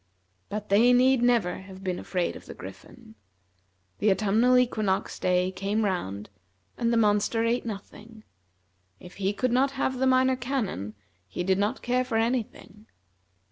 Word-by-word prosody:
But 210 Hz, 0 st, -5 dB
they 230 Hz, +5 st, +5 dB
need 255 Hz, 0 st, +4 dB
never 235 Hz, -8 st, +2 dB
have 190 Hz, 0 st, -12 dB
been 185 Hz, -2 st, -2 dB
afraid 180 Hz, -2 st, -2 dB
of -, -, -12 dB
the -, -, -9 dB
Griffin. 110 Hz, -, -12 dB, 0.9 s
The 215 Hz, -, +3 dB
autumnal 215 Hz, +6 st, +3 dB
equinox 215 Hz, -6 st, 0 dB
day 180 Hz, 0 st, +1 dB
came 200 Hz, +3 st, -1 dB
round, 105 Hz, -, -3 dB, 0.4 s
and 235 Hz, -1 st, 0 dB
the 235 Hz, -, +2 dB
monster 210 Hz, +1 st, +2 dB
ate 235 Hz, +1 st, 0 dB
nothing. 215 Hz, +1 st, -9 dB, 0.8 s
If 180 Hz, -, -13 dB
he 195 Hz, 0 st, 0 dB
could 255 Hz, +4 st, -1 dB
not 270 Hz, +3 st, +2 dB
have 265 Hz, -1 st, -2 dB
the 265 Hz, -, +2 dB
Minor 260 Hz, 0 st, +3 dB
Canon, 240 Hz, -, -3 dB, 0.3 s
he 95 Hz, -, -4 dB
did 190 Hz, +1 st, +1 dB
not 210 Hz, +6 st, -1 dB
care 250 Hz, +1 st, +1 dB
for 245 Hz, -3 st, -2 dB
any 235 Hz, +2 st, +2 dB
thing. 210 Hz, 0 st, -16 dB
215 Hz, 160 wpm, -26 LUFS, 190-245 Hz, 0.9 s, they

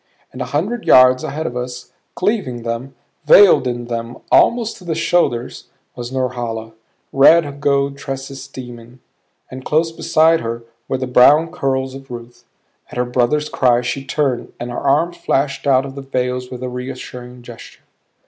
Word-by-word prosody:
And -, -, -7 dB
a -, -, -1 dB
hundred 205 Hz, +11 st, -2 dB
yards 130 Hz, 0 st, +6 dB
ahead 155 Hz, +2 st, -4 dB
of 120 Hz, -, -4 dB
us, 125 Hz, 0 st, -6 dB, 0.2 s
cleaving 180 Hz, -, -1 dB
them, 115 Hz, +4 st, -5 dB, 0.3 s
veiled 195 Hz, -10 st, +7 dB
in 120 Hz, -1 st, -3 dB
them 115 Hz, 0 st, -5 dB
almost 235 Hz, -2 st, +3 dB
to -, -, -15 dB
the 165 Hz, -2 st, -3 dB
shoulders, 160 Hz, -7 st, 0 dB, 0.3 s
was 120 Hz, 0 st, -7 dB
Norhala, 120 Hz, -4 st, -3 dB, 0.4 s
red 145 Hz, 0 st, +4 dB
gold 140 Hz, -1 st, +1 dB
tresses 135 Hz, 0 st, -6 dB
steaming; 120 Hz, -1 st, -11 dB, 0.5 s
and 130 Hz, 0 st, -8 dB
close 160 Hz, +3 st, +1 dB
beside 160 Hz, 0 st, +3 dB
her 115 Hz, 0 st, -5 dB, 0.2 s
were 135 Hz, -, -1 dB
the 130 Hz, -, -3 dB
brown 145 Hz, +6 st, +5 dB
curls 135 Hz, -5 st, -2 dB
of 135 Hz, 0 st, -11 dB
Ruth. 120 Hz, 0 st, -10 dB, 0.4 s
At -, -, -9 dB
her 125 Hz, -, +1 dB
brother's 125 Hz, +5 st, 0 dB
cry 125 Hz, -4 st, +2 dB
she 135 Hz, +3 st, -3 dB
turned 135 Hz, -3 st, -2 dB
and 120 Hz, +1 st, -5 dB
her 120 Hz, -, -4 dB
arm 160 Hz, +5 st, +1 dB
flashed 140 Hz, -3 st, -1 dB
out 135 Hz, -1 st, +3 dB
of 135 Hz, -, -8 dB
the 140 Hz, -, -7 dB
veils 125 Hz, -1 st, -3 dB
with 125 Hz, 0 st, -8 dB
reassuring 125 Hz, -1 st, -7 dB
gesture. 120 Hz, -1 st, -12 dB
130 Hz, 160 wpm, -18 LUFS, 125-145 Hz, 0.5 s, veiled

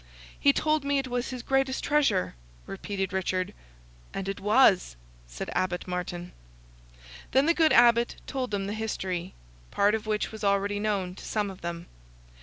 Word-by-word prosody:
"He 280 Hz, -, +6 dB
told 305 Hz, +1 st, +1 dB
me 280 Hz, 0 st, +1 dB
it 270 Hz, -1 st, -1 dB
was 245 Hz, 0 st, -2 dB
his 250 Hz, -2 st, -6 dB
greatest 270 Hz, 0 st, 0 dB
treasure!" 275 Hz, -11 st, +2 dB, 0.3 s
repeated 195 Hz, -1 st, -4 dB
Richard. 185 Hz, -1 st, -1 dB, 0.6 s
"And 195 Hz, -, -3 dB
it 195 Hz, -, -3 dB
was!" 210 Hz, -, +4 dB, 0.3 s
said -, -, -6 dB
Abbot 180 Hz, -1 st, -1 dB
Martin. 180 Hz, -1 st, -4 dB, 1.0 s
Then 265 Hz, +3 st, +5 dB
the 335 Hz, -, +4 dB
good 320 Hz, -2 st, +4 dB
Abbot 235 Hz, 0 st, +5 dB
told 260 Hz, -2 st, -3 dB
them 200 Hz, -2 st, -2 dB
the 200 Hz, -, -3 dB
history, 190 Hz, -5 st, -3 dB, 0.3 s
part 205 Hz, +1 st, +3 dB
of 220 Hz, 0 st, -2 dB
which 215 Hz, -1 st, -1 dB
was 220 Hz, -1 st, -9 dB
already 200 Hz, 0 st, +1 dB
known 200 Hz, -4 st, -1 dB
to -, -, -12 dB
some 210 Hz, -2 st, -1 dB
of 190 Hz, -, -13 dB
them. 170 Hz, 0 st, -5 dB
205 Hz, 165 wpm, -28 LUFS, 185-250 Hz, 1.0 s, He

